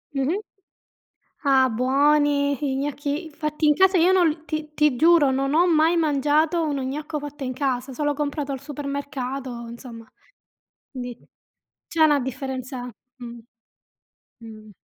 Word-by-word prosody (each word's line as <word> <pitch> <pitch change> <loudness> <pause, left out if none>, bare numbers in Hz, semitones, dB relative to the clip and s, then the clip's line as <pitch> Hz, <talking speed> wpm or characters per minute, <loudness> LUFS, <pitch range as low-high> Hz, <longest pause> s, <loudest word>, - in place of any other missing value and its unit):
Mh-mh. 280 +9 0 1.0
Ah, 265 -2 +4
buoni, 285 +3 +2
i 280 -2 -1
gnocchi 290 +3 -3
fatti 305 0 -2
in 295 - +5
casa, 380 +2 +4
io 350 +2 +4
non 370 -2 +4
l 310 0 -3
ti 310 -1 -5
ti 300 -3 +2
giuro 320 0 +5
non 275 +2 0
ho 345 +3 +4
mai 325 +1 +3
mangiato 310 +2 +2
uno 280 -2 -2
gnocco 295 +3 -4
fatto 290 0 -8
in 255 -1 -3
casa, 260 -1 -2
solo 290 +2 -1
comprato 290 -1 -3
al 270 - -4
supermercato, 275 -3 -5
insomma. 235 -1 -10 0.9
Di 245 -3 -7 0.7
c'è 325 -1 +2
una 295 -2 +4
differenza 260 0 -5 0.3
mh. 240 -1 -9 1.1
Mh. 215 -1 -12
285 Hz, 140 wpm, -23 LUFS, 260-305 Hz, 1.1 s, in